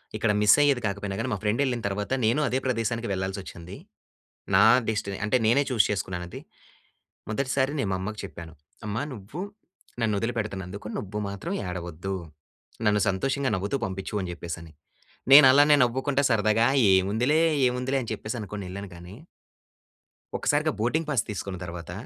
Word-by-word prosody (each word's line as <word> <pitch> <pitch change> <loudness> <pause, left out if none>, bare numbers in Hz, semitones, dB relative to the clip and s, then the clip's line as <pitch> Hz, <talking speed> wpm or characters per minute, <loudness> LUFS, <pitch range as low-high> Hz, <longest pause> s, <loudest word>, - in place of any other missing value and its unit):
ఇక్కడ 110 0 +1
మిస్ 105 +4 +6
అయ్యేది 140 -4 +3
కాకపోయినా 100 0 -4
గాని 120 +3 -2
మా - - -1
ఫ్రెండ్ 105 +5 +1
ఎళ్ళిన 125 -3 -1
తర్వాత, 100 +3 -4
నేను 115 +6 +2
అదే 130 - 0
ప్రదేశానికి 115 -2 -1
వెళ్లాల్సోచ్చింది. 95 -1 -5 0.8
నా - - +7 0.2
డెస్టీని 105 -3 -2
అంటే, 110 +4 +2
నేనే 130 +6 +4
చూజ్ 115 -6 +3
చేసుకున్నాను 95 -3 -3
అది. - - -8 0.9
మొదటిసారి, 130 +4 0
నేను 105 - 0
మా - - 0
అమ్మకు 105 +2 -5
చెప్పాను. 85 -2 -10 0.3
అమ్మా, 105 +3 -2
నువ్వు 115 - -8 0.6
నన్ను 110 -2 +1
వదిలిపెడుతున్నందుకు, 100 -4 -4
నువ్వు 105 +1 -5
మాత్రం 100 -1 -6 0.2
ఏడవద్దు. 90 +1 -5 0.7
నన్ను 105 0 +3
సంతోషంగా 135 +8 0
నవ్వుతూ 100 +7 -2
పంపించు 95 +1 -5
అని 90 -2 -4
చెప్పేసి 85 0 -6
అని. 80 -2 -13 0.6
నేను 140 +1 +11
అలానే 145 +2 +6
నవ్వుకుంటే 135 +3 0
సరదాగా 110 0 +3 0.3
ఏముందిలే, 110 - +2 0.3
ఏముందిలే 125 +2 -1
అని 115 - -7
చెప్పేసి 110 +3 -5
అనుకోని 105 -1 -6
ఎళ్ళాను 100 +1 -7
కానీ... 90 +3 -11 1.2
ఒక్కసారిగా - - +1
బోర్డింగ్ 150 +9 0
పాస్ 135 -8 +1
తీసుకున్న 100 -2 -4
తర్వాత, 85 -1 -7
105 Hz, 150 wpm, -26 LUFS, 95-125 Hz, 1.2 s, నేను